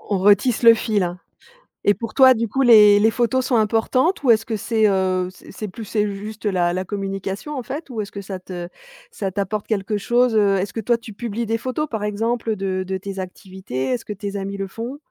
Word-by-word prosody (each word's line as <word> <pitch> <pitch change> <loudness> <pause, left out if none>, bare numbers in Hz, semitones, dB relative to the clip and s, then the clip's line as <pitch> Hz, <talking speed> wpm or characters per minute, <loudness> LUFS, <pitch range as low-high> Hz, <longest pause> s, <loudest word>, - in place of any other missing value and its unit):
On 200 - -2
on - - -1
retisse 205 +5 +3
le 230 -1 +9
fil, 215 -3 0
hein. 175 0 -3 0.7
Et 205 - +7
pour 230 +1 -7
toi, 260 -1 +8
du 230 -1 -1
coup, 270 +6 0
les 210 -4 +7
les 220 +2 +4
photos 250 +2 0
sont 245 - +2
importantes? 225 - +1
Ou 245 - +5
est-ce 225 0 +4
que 225 - -2
c'est, 220 +1 +1
heu, 185 -1 0
c'est - - -15
c'est 215 +2 -6
plus 215 +4 -8
c'est 210 0 0
juste 215 +2 -8
la 175 -3 +1
la 185 +1 -2
communication, 195 - -4
en - - -2
fait? 280 +4 -6
Ou 220 -3 -3
est-ce 200 - -7
que 200 - -6
ça 195 -1 -6
te 180 -1 -7 0.4
ça 195 -2 -4
t'apporte 200 +2 -3
quelque 210 -1 -1
chose, 240 +2 +2
heu? 200 -2 +3
Est-ce 190 0 -3
que 225 - -4
toi, 235 +2 +2
tu 225 -2 -11
publies 230 +1 -4
des 225 +1 -1
photos, 260 +5 -2
par 220 -3 -3
exemple, 225 +2 -1
de 190 -1 -2
de 190 0 -3
tes 195 0 -7
activités? 185 - -5
Est-ce 125 -1 -1
que 210 - -5
tes 200 0 -6
amis 195 0 -4
le 195 0 -3
font? 235 +7 -6
210 Hz, 240 wpm, -21 LUFS, 195-230 Hz, 0.7 s, le